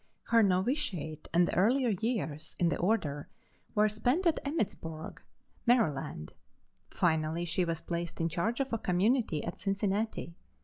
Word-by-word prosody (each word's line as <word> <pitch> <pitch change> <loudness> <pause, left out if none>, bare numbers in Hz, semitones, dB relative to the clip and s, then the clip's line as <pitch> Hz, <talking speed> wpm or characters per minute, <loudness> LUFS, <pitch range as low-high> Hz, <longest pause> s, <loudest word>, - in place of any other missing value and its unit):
Her 230 -1 +4
novitiate 185 - 0
and 175 +1 +3
earlier 240 +7 +3
years 190 - -2
in 175 - +3
the - - 0
order 160 -8 0 0.5
were 210 0 +5
spent 245 - 0
at 335 - +3
Emmittsburg, 190 - -4 0.5
Md. 150 - +1 0.6
Finally 160 0 +1
she 175 +2 0
was 165 -2 -2
placed 170 -1 -4
in 165 - +1
charge 200 - -1
of 270 -3 -1
a 230 - +1
community 190 - +1
at 170 - -5
Cincinnati. 200 -2 -1
185 Hz, 135 wpm, -31 LUFS, 165-230 Hz, 0.6 s, were